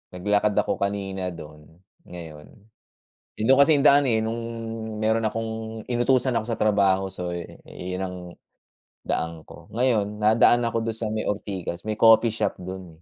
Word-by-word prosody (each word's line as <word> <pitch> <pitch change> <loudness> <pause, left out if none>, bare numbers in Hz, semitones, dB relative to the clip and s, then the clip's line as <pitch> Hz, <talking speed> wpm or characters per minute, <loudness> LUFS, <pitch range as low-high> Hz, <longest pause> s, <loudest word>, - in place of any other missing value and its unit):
Naglakad 105 +2 +1
ako - - 0
kanina 95 -2 -2
do'n, 75 -2 -12 0.4
ngayon 80 -4 -10 0.9
eh, 110 - 0
dun 135 - +7
kasi 140 +3 +5
yung 145 - +5
daan, 140 +1 +6
eh, 115 -4 +2
nung 110 +1 -2 0.6
meron 110 +1 +1
akong 110 0 -4
inutusan 125 +1 +1
ako 110 - +1
sa 115 -1 -4
trabaho 100 -2 +2
so, 90 -2 -5 0.3
yun 90 +1 -6
ang 90 -1 -5 0.9
daan 80 -1 -3
ko. - - -14
Ngayon 110 -4 0
nadaan 115 +2 +4
ako 115 -1 -1
dun 115 -1 -2
sa 115 - -2
may 110 0 -2
Ortigas, 95 -3 -4
may 110 - 0
coffee 115 0 +5
shop 105 -3 -2
dun, 95 +1 -7
eh. - - -14
105 Hz, 160 wpm, -24 LUFS, 95-115 Hz, 0.9 s, dun